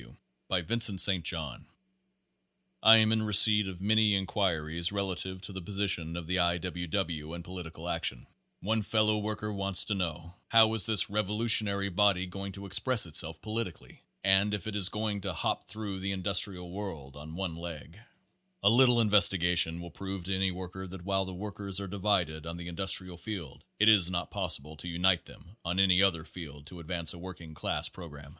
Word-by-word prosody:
W. - - -16 0.3
By 90 - 0
Vincent 110 +1 +2
St. 95 -3 +5
John. 80 -5 -3 1.1
I 110 0 +9
am 110 0 +4
in 110 0 +2
receipt 105 -1 +6
of 95 -1 -8
many 105 0 +3
inquiries 85 -4 -1
relative 95 -1 -3
to 100 - -7
the 95 - -6
position 90 -4 -2
of 85 - -6
the 90 +3 -1
I. 85 -1 +2
W. 90 0 -5
W. 80 -3 -3
and 85 - -8
political 85 -2 -8
action. 85 -8 -2 0.4
One 110 +3 0
fellow 110 +1 +1
Page - - -3
Forty - - -6
worker 105 0 -4
wants 100 -1 +3
to 105 - -1
know, 85 -2 -4
"How 110 -1 +5
is 110 -4 +2
this 105 -5 +3
revolutionary 105 -1 +2
body 95 0 +2
going 95 +2 -7
to 100 +1 -8
express 110 +4 +1
itself 80 0 -1
politically 110 -4 -6 0.2
?" - - -46
and 100 +2 +3
"if 100 - -8
it 110 -1 -5
is 100 -3 +4
going 105 -1 -3
to 95 -2 -4
hop 85 - -2
through 105 -2 -6
the 95 +1 -2
industrial 95 -2 0
world 80 -9 -7
on 75 +2 -10
one 90 -3 -4
leg?'* 85 +2 -9 0.6
A 100 - +6
little 120 0 +5
investigation 90 -5 +3
will 85 0 -9
prove 95 +1 -6
to 95 +2 -2
any 95 0 +1
worker 95 +1 -7
that 90 -1 -10
while 95 -1 0
the 95 - -7
workers 100 0 -5
are 100 - -5
divided 90 -5 -1
on 85 +1 -6
the 85 0 -7
industrial 90 0 +1
field 90 -6 -7
it 105 - +3
is 100 -5 +6
not 90 -1 -3
possible 75 +3 -3
to 90 - -7
unite 90 0 +2
them 95 +6 -16
on 90 +2 -2
any 95 -1 +5
other 85 -5 +2
field 75 -5 -10
to 85 +3 -11
ad 80 - -11
vance 85 -3 -2
a 85 - -11
working 85 -3 -10
class 75 - -2
program. 75 -5 -11
95 Hz, 195 wpm, -30 LUFS, 85-100 Hz, 1.1 s, I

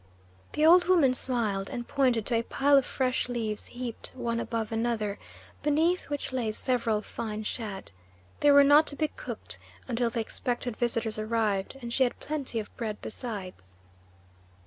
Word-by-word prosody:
The 305 - +2
old 355 +2 +7
woman 335 -8 +4
smiled 220 -7 0
and 240 -1 -5
pointed 250 -6 +2
to 235 -2 +1
a - - +1
pile 280 +4 +3
of 275 -2 +5
fresh 255 -1 0
leaves 225 -3 -2
heaped 245 -2 -6
one 235 -2 -2
above 230 -2 -3
another, 225 -3 -1 0.4
beneath 320 +5 +1
which 290 -2 -3
lay 235 -4 0
several 230 -4 0
fine 215 -1 -5
shad. 210 - -5 0.5
They 290 - +4
were 285 0 +8
not 290 +2 +6
to 285 - 0
be 310 +1 0
cooked - - -7 0.3
until 240 -1 0
the 230 - -3
expected 240 +1 -2
visitors 230 -2 0
arrived, 215 0 0
and 235 0 -4
she 265 - 0
had 245 - -1
plenty 280 -6 -3
of 210 - -8
bread 220 -3 -3
besides. 185 - -7
240 Hz, 165 wpm, -28 LUFS, 220-270 Hz, 0.5 s, were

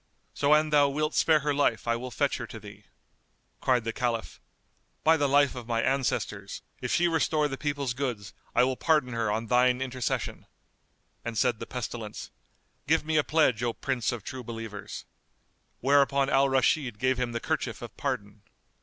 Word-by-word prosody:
So 145 +1 +4
an 155 0 +2
thou 145 -1 +5
wilt 150 +2 -1
spare 155 -2 +4
her 145 +1 0
life 145 -4 +1
I 115 - +2
will 125 +2 -5
fetch 140 +3 0
her 120 - -6
to 110 - -9
thee." 105 -1 -13 0.7
Cried 125 -2 +2
the 115 0 -3
Caliph, 120 -3 -2 0.6
"By 160 +1 +6
the 145 -3 +1
life 140 0 +4
of 125 -3 -8
my 115 -1 0
ancestors, 120 -7 -1 0.2
if - - -3
she 175 - +3
restore 155 -2 +1
the 135 - -4
people's 140 -3 -2
goods, 120 -6 -4 0.2
I 125 - +5
will 130 +1 +1
pardon 150 -4 +1
her 115 -2 0
on 110 +2 -1
thine 125 +1 +3
intercession!" 130 -2 -3 0.8
And 115 -1 -4
said 120 -2 +2
the 115 - -6
Pestilence, 115 -3 -6 0.6
"Give 160 +1 +2
me 155 0 +1
a 150 - +4
pledge, 145 -9 +2
O 120 -1 0
Prince 130 -2 -1
of 120 -5 -6
True 130 +2 -6
Believers!" 115 -3 -7 0.8
Whereupon 140 0 +3
Al 135 0 +4
Rashid 130 -2 +1
gave 130 +2 +1
him 125 -1 -1
the 115 - -1
kerchief - - -3
of - - -9
pardon. 100 +1 -4
130 Hz, 180 wpm, -28 LUFS, 115-145 Hz, 0.8 s, By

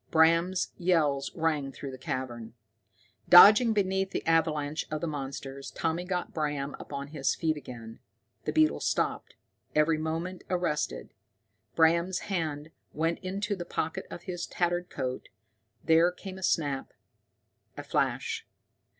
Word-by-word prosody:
Bram's 165 +3 +3
yells 150 -6 +2
rang 155 -4 0
through 135 +1 -7
the 130 - -8
cavern. 120 -3 -5 0.7
Dodging 210 +6 +9
beneath 190 -2 +1
the - - -4
avalanche 155 -2 +1
of 155 - -2
the 170 - -3
monsters, 135 -2 -5
Tommy 165 +2 -2
got 180 -1 -3
Bram 145 -3 -2
upon 140 0 -6
his 145 -3 0
feet 160 -2 0
again. 120 -5 -9 0.5
The - - 0
beetles 315 0 +3
stopped, - - -1 0.4
every 155 +1 +3
movement 165 +3 -3
arrested. 175 -5 -2 0.6
Bram's 170 +3 +3 0.2
hand 155 -3 -2 0.2
went 165 +2 0
to 200 +2 -2
the 180 - -5
pocket 160 -2 -3
of 175 - -8
his 175 -1 -5
tattered 175 0 -1
coat, 130 0 -4 0.5
there 165 +2 +5
came 190 +1 -9
a - - -11
snap, 145 -6 0 0.8
a - - -5
flash. - - -1
160 Hz, 135 wpm, -29 LUFS, 145-180 Hz, 0.8 s, Dodging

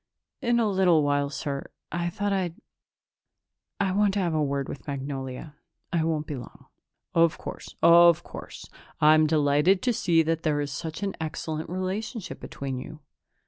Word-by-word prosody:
"In 240 0 +2
a 225 - +2
little 185 -6 +4
while, 145 0 +1
sir. 140 -1 -4 0.2
I 175 0 -1
thought 205 +3 -1
I'd 180 -4 -1 1.2
I 195 -2 +1
wanted 200 +1 +2
to 200 - 0
have 170 -3 0
a 155 - +1
word 140 -1 -1
with 140 - -8
Magnolia. 135 0 -5 0.4
I 165 -2 +2
won't 160 -2 -1
be 150 - -5
long." 120 -3 -10 0.5
"Of 165 -1 +4
course, - - -8
of 170 0 +7
course. - - -9 0.3
I'm 155 +1 +6
delighted 150 +4 +3
to 245 - +2
see 170 -6 +3
that 165 0 0
there 150 -2 +1
is 145 -1 -2
such 160 +6 -5
an 195 -1 -2
excellent 155 0 -4
relationship 190 +3 -4
between 135 -2 -5
you.... 155 +4 -9
160 Hz, 165 wpm, -26 LUFS, 145-185 Hz, 1.2 s, of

